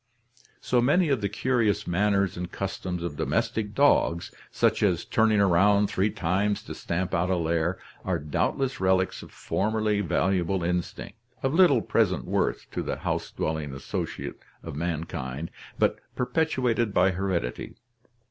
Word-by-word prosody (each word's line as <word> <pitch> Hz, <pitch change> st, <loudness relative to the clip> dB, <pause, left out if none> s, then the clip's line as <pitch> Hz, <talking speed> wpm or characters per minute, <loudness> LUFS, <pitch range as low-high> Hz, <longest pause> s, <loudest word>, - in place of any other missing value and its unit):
So 125 Hz, -, +2 dB
many 150 Hz, +7 st, +3 dB
of 135 Hz, -6 st, +1 dB
the 100 Hz, -, 0 dB
curious 110 Hz, -2 st, +1 dB
manners 100 Hz, +2 st, +1 dB
and 90 Hz, 0 st, -5 dB
customs 90 Hz, -2 st, -4 dB
of 75 Hz, -4 st, -4 dB
domestic 105 Hz, -1 st, -1 dB
dogs, 110 Hz, -12 st, +3 dB, 0.2 s
such -, -, +1 dB
as -, -, +2 dB
turning 110 Hz, -1 st, +3 dB
around 100 Hz, +2 st, +4 dB
three 95 Hz, +3 st, +1 dB
times 100 Hz, +1 st, 0 dB
to -, -, -7 dB
stamp 90 Hz, +2 st, -3 dB
out 85 Hz, +2 st, +1 dB
a 95 Hz, -, +2 dB
lair, 85 Hz, +1 st, 0 dB, 0.3 s
are 95 Hz, -2 st, 0 dB
doubt 75 Hz, -2 st, -1 dB
less 135 Hz, 0 st, -2 dB
relics 95 Hz, 0 st, +1 dB
of -, -, -12 dB
formerly 105 Hz, 0 st, 0 dB
valuable 95 Hz, 0 st, +1 dB
instinct, 90 Hz, +5 st, -3 dB, 0.2 s
of 135 Hz, +1 st, +1 dB
little 165 Hz, -9 st, +5 dB
present -, -, +1 dB
worth -, -, 0 dB
to -, -, -2 dB
the -, -, -2 dB
house -, -, -2 dB
dwelling 75 Hz, -3 st, -3 dB
associate 70 Hz, -, -5 dB, 0.2 s
of -, -, -7 dB
mankind, 80 Hz, -3 st, -4 dB, 0.3 s
but -, -, +2 dB, 0.2 s
perpetuated 125 Hz, -5 st, 0 dB
by 95 Hz, +2 st, +4 dB
heredity. 90 Hz, -9 st, -2 dB
95 Hz, 145 wpm, -26 LUFS, 85-110 Hz, 0.3 s, little